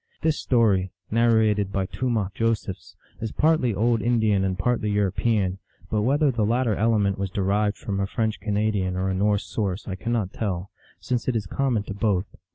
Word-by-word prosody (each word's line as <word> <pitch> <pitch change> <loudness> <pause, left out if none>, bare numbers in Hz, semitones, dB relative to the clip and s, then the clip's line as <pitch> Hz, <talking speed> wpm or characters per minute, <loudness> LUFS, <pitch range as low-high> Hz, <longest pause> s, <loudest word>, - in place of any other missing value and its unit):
This 160 -2 +1
story, 105 -7 +2 0.2
narrated 110 -3 +3
by 95 -1 0
Tomah 110 -2 -1
Josephs, 115 -3 -2 0.2
is 110 -1 -4
partly 150 -8 +2
old 115 +2 +2
Indian 110 -5 +2
and 95 -1 -1
partly 115 +2 0
European, 100 -1 +1 0.3
but 105 - +1
whether 140 +5 +3
the 115 -3 0
lat 120 +5 +2
ter 110 - +2
element 105 -2 +1
was 100 -1 -1
derived 100 +2 0
from 100 -2 -3
a 100 - 0
French 110 0 -1
Canadian 105 -3 0
or 95 +1 -1
a - - 0
Norse 100 +2 +1
source 100 -2 -3
I 95 - -3
cannot 105 0 -2
tell, 95 -3 -3 0.3
since 125 -2 -2
it 125 - +1
is 110 -3 -1
common 120 +2 0
to 100 - -6
both. 100 -2 0
105 Hz, 180 wpm, -24 LUFS, 95-115 Hz, 0.3 s, narrated